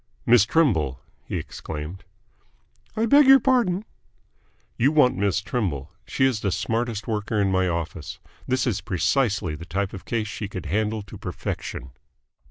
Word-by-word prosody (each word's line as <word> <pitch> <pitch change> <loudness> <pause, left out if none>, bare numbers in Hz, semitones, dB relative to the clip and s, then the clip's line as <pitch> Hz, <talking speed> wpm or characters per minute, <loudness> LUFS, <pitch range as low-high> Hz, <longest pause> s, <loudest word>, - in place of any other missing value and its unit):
"Miss 115 -3 +6
Trimble," 80 - +2 0.3
he - - -3
exclaimed. 80 +5 -7 0.9
"I 220 - +2
beg 285 +4 +6
your 270 0 +9
pardon." 230 -7 +2 0.9
"You 135 +5 +3
want 150 -5 +4
Miss 100 0 +1
Trimble. 90 - -3 0.2
She 130 - +1
is 130 -5 +1
the 100 -2 -1
smartest 110 +3 -2
worker 105 -1 -1
in 100 -1 +2
my 95 0 +2
office. 85 -2 -4 0.3
This 130 0 +1
is 110 -7 -1
precisely 95 - 0
the 75 - -7
type 95 +2 -2
of 95 - -9
case 115 -2 -1
she 105 0 -5
could 95 -4 -7
handle 105 +5 -1
to 100 - -11
perfection." 70 - -5
105 Hz, 155 wpm, -24 LUFS, 90-125 Hz, 0.9 s, your